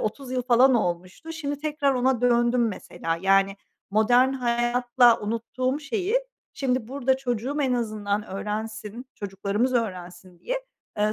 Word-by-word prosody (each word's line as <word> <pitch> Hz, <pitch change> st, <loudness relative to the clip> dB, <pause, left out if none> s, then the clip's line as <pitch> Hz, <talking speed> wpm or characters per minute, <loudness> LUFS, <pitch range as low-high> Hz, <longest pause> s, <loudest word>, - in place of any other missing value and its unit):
30 255 Hz, +4 st, -4 dB
yıl 255 Hz, -1 st, 0 dB
falan 250 Hz, +1 st, +5 dB
olmuştu. 185 Hz, -, -2 dB
Şimdi 290 Hz, -3 st, -4 dB
tekrar 295 Hz, -2 st, 0 dB
ona 255 Hz, -1 st, +1 dB
döndüm 240 Hz, -1 st, +3 dB
mesela. 165 Hz, -4 st, -4 dB
Yani, 195 Hz, +1 st, +3 dB, 0.3 s
modern 245 Hz, +5 st, +4 dB
hayatla 240 Hz, -1 st, +3 dB
unuttuğum 255 Hz, +6 st, -2 dB
şeyi, 410 Hz, +7 st, -1 dB, 0.4 s
şimdi 255 Hz, -4 st, -1 dB
burada 265 Hz, 0 st, +1 dB
çocuğum 255 Hz, +1 st, -3 dB
en 260 Hz, -, +1 dB
azından 215 Hz, -3 st, -1 dB
öğrensin, 215 Hz, +4 st, -5 dB
çocuklarımız 205 Hz, +5 st, -1 dB
öğrensin 180 Hz, -5 st, -4 dB
diye, -, -, -3 dB, 0.4 s
ııı, 210 Hz, +1 st, +2 dB
240 Hz, 130 wpm, -25 LUFS, 210-260 Hz, 0.4 s, falan